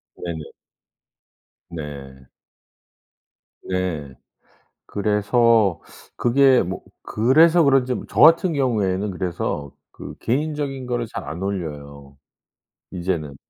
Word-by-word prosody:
네네. 80 -4 -6 1.2
네. 70 -5 -9 1.4
예. 85 -8 -3 0.7
그래서 105 -2 +2 0.4
그게 130 +1 +4
뭐 95 +1 -5 0.2
그래서 160 +10 +4
그런지 135 -3 +3
뭐 - - -6
저 - - -2
같은 165 +3 +6
경우에는 105 -8 0
그래서 85 -5 -4 0.2
그 - - -10
개인적인 140 0 -2
거를 120 -1 -2
잘 115 - -5
안 85 +3 -6
올려요 70 -7 -6 0.7
이제는. 85 -6 -3
100 Hz, 185 characters per minute, -22 LUFS, 80-130 Hz, 1.4 s, 같은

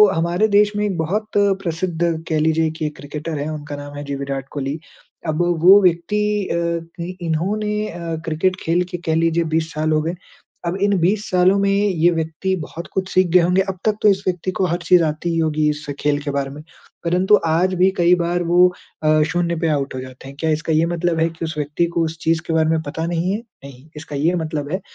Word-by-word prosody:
हमारे 170 +6 +1
देश 205 0 +3
में 210 - +1
एक 190 -4 -2
बहुत 205 +7 -1
प्रसिद्ध 185 -4 0 0.3
कह 155 -1 +1
लीजिये 160 +1 +2
की 155 - -1
एक 150 - -7
क्रिकेटर 150 +2 -5
है 145 - -3
उनका 150 -1 -6
नाम 145 0 -9
है, 145 - -5
जी 140 0 -3
विराट 135 -1 -4
कोहली। 140 +2 -3 0.5
अब 155 +2 +1 0.2
वो 195 +3 +8
व्यक्ति 180 +4 +2 0.2
अ, 170 - -1 0.7
इन्होने 210 +6 -1
अ, 170 -1 -5
क्रिकेट 165 +4 0
खेल 170 +2 +2
के 175 - -3
कह 160 - +2
लीजिए 165 +1 +2
20 160 0 0
साल 155 +1 -1
हो 155 - +2
गए। 165 +3 -2 0.5
अब 175 +3 -1
इन 200 -1 +3
20 200 +5 +1
सालों 185 +2 +4
में 200 0 +2
ये 190 -4 +3
व्यक्ति 165 +3 -1
बहुत 165 +3 -8
कुछ 190 -1 -2
सीख 185 0 +4
गए 180 - +7
होंगे 180 +3 +3
अब 190 - -4
तक 215 - +3
तो - - +6
इस 195 0 +1
व्यक्ति 180 0 -1
को 190 - +3
हर 170 +1 0
चीज़ 175 0 +5
आती 155 +2 -2
ही 165 - 0
होगी 155 -1 +1
इस 150 0 -4
खेल 145 0 +1
के 145 - -2
बारे 140 -1 -2
में। 145 +2 -9 0.4
परंतु 180 +4 +4
आज 175 +4 +2
भी 185 +1 +4
कई 175 +1 +5
बार 175 +1 0
वो 175 +1 +5 0.4
अ, 155 0 +4
शून्य 175 -1 0
पे 165 - +1
आउट 140 -2 -3
हो 130 - -3
जाते 130 +1 -11
हैं। 140 - -11
क्या 160 - +1
इसका 160 +1 -2
ये 160 +2 +3
मतलब 175 -1 -1
है 165 - +3
कि 165 0 -6
उस 160 -1 -5
व्यक्ति 150 +3 0
को 170 - +2
उस 160 +1 -5
चीज़ 160 0 +1
के 165 - -1
बारे 160 -1 +2
में 160 0 +1
पता 160 +3 -3
नहीं 175 +2 -1
है? 210 - 0 0.3
नहीं। 140 +2 -13
इसका 150 -1 -7
ये 160 +6 +1
मतलब 155 -2 -4
है 185 - -2
165 Hz, 230 wpm, -20 LUFS, 155-185 Hz, 0.7 s, वो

